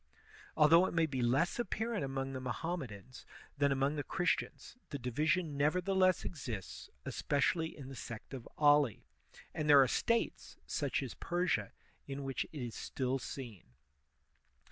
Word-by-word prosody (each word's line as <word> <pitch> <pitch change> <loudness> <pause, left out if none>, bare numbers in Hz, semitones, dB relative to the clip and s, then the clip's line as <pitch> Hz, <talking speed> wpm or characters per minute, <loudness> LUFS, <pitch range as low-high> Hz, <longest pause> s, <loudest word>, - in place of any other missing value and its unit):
Although 165 +4 +7
it - - -5
may 165 -1 +4
be 135 -5 -2
less 135 - +2
apparent 230 -3 -1
among 135 0 -3
the 130 - -4
Mohammedans 125 - -5 0.4
than 140 -1 +4
among 135 +2 +1
the 145 - -1
Christians, 175 +9 -1
the 140 - -3
division 150 +6 0
nevertheless 185 +5 +2
exists, 120 - -6 0.2
especially 160 +3 0
in 140 -3 -8
the 135 - -8
sect 115 +1 -8
of 130 -3 -7
Ali; 145 -6 +4 0.5
and 150 -1 -2
there 140 -2 +9
are - - +1
States, 230 - 0
such - - -1
as - - -5
Persia, 175 - -1 0.4
in 140 0 -5
which 135 -1 -2
it 145 -5 -7
is 115 - -6
still 130 0 -2
seen. 120 - -7
140 Hz, 145 wpm, -34 LUFS, 130-165 Hz, 0.5 s, there